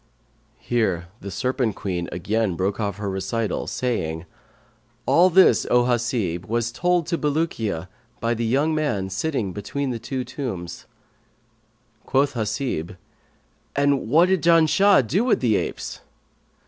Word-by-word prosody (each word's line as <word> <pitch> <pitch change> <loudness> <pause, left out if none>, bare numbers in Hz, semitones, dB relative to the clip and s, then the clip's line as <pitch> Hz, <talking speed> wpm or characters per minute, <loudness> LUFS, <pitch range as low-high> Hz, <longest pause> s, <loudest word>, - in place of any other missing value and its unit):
Here 95 -8 -1
the 100 - -7
Serpent 120 +3 -1
queen 90 -3 -3
again 100 +2 -1
broke 95 +4 -1
off 100 -3 -2
her 105 -1 -4
recital 95 +2 -2
saying, 85 -10 -2 0.8
"All 180 +2 +5
this, 185 +1 +5
O 125 0 +4
Hasib, 115 -8 -1
was 115 +1 -1
told 175 +4 +1
to 170 +1 -2
Bulukiya 140 - -1 0.3
by 115 +1 0
the 115 0 -2
young 140 +7 +1
man 105 -12 -1
sitting 105 - -2
between 130 +7 -3
the 120 - -4
two 130 +3 -4
tombs." 95 -12 -6 1.2
Quoth 140 +1 +2
Hasib, 110 - -3 0.8
"And 140 -3 +2
what 165 +7 +5
did 190 -3 +2
Janshah 170 0 +5
do 185 - +1
with 245 - +2
the 115 -4 +2
apes?" - - -4
120 Hz, 135 wpm, -23 LUFS, 100-145 Hz, 1.2 s, All